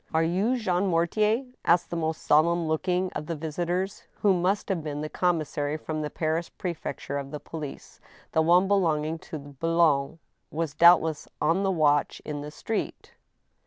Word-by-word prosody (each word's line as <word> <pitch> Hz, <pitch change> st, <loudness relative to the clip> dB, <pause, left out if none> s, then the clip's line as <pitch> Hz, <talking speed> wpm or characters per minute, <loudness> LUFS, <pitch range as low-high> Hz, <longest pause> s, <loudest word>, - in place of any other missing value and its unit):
•' -, -, -44 dB
Are 160 Hz, -, +4 dB
you 195 Hz, +10 st, +1 dB
Jean 190 Hz, -4 st, 0 dB
Mortier? 210 Hz, +8 st, +1 dB
" -, -, -49 dB
asked 170 Hz, +1 st, +2 dB
the -, -, -2 dB
most 160 Hz, -1 st, -2 dB
solemn 165 Hz, +2 st, +3 dB
looking 180 Hz, +3 st, 0 dB
of 150 Hz, 0 st, -5 dB
the 165 Hz, -, -2 dB
visitors, 175 Hz, +5 st, -3 dB, 0.2 s
who 200 Hz, -2 st, +5 dB
must 185 Hz, +3 st, 0 dB
have 180 Hz, -5 st, -1 dB
been 150 Hz, -1 st, -4 dB
the 155 Hz, -, -4 dB
commissary 155 Hz, -4 st, -1 dB
from 155 Hz, 0 st, -4 dB
the 150 Hz, -, -3 dB
Paris 160 Hz, +2 st, -2 dB
pre 180 Hz, -2 st, -4 dB
fecture 140 Hz, -2 st, -5 dB
of 140 Hz, +2 st, -8 dB
police 155 Hz, -4 st, -8 dB, 0.3 s
(the 160 Hz, -, +3 dB
one 175 Hz, +4 st, +4 dB
belonging 165 Hz, -5 st, +1 dB
to 160 Hz, -, -7 dB
Boulogne 150 Hz, +1 st, +1 dB, 0.3 s
was 160 Hz, -2 st, -3 dB
doubtless 165 Hz, -2 st, +5 dB
on 165 Hz, +5 st, +2 dB
the 195 Hz, -, +1 dB
watch 150 Hz, -5 st, +2 dB
in 150 Hz, -1 st, -4 dB
the 150 Hz, -, -6 dB
street). 215 Hz, +8 st, -4 dB
165 Hz, 175 wpm, -27 LUFS, 150-180 Hz, 0.3 s, who